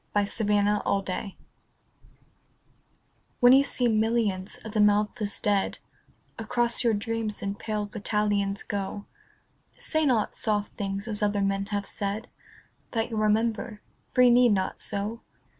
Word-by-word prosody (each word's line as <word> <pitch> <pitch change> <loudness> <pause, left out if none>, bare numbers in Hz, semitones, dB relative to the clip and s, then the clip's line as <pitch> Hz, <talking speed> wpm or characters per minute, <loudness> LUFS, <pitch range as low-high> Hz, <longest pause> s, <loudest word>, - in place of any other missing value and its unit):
XCI 205 +1 0
The 210 - +3
Army 205 0 +2
of 195 -1 0
Death 195 +2 -4 2.1
WHEN 245 +1 +7
you 270 +1 +7
see 250 -3 +1
millions 215 -4 0
of 220 - -6
the 215 - +2
mouthless 210 0 +1
dead 205 -2 +1 0.6
Across 235 +2 0
your 230 -2 +3
dreams 220 0 -3
in 200 0 -1
pale 210 0 -3
battalions 205 -1 -1
go, 200 0 -4 0.7
Say 315 -1 0
not 235 -5 +1
soft 210 -2 -1
things 200 +1 -4
as 215 -2 -3
other 205 -1 +1
men 195 0 0
have 205 -1 -2
said, 205 +3 -3 0.6
That 230 0 -1
you'll 220 - -1
remember. 215 0 0 0.3
For 250 - +6
you 245 - +7
need 245 -2 +5
not 190 -1 -1
so. 210 +3 -3
210 Hz, 140 wpm, -27 LUFS, 200-225 Hz, 2.1 s, WHEN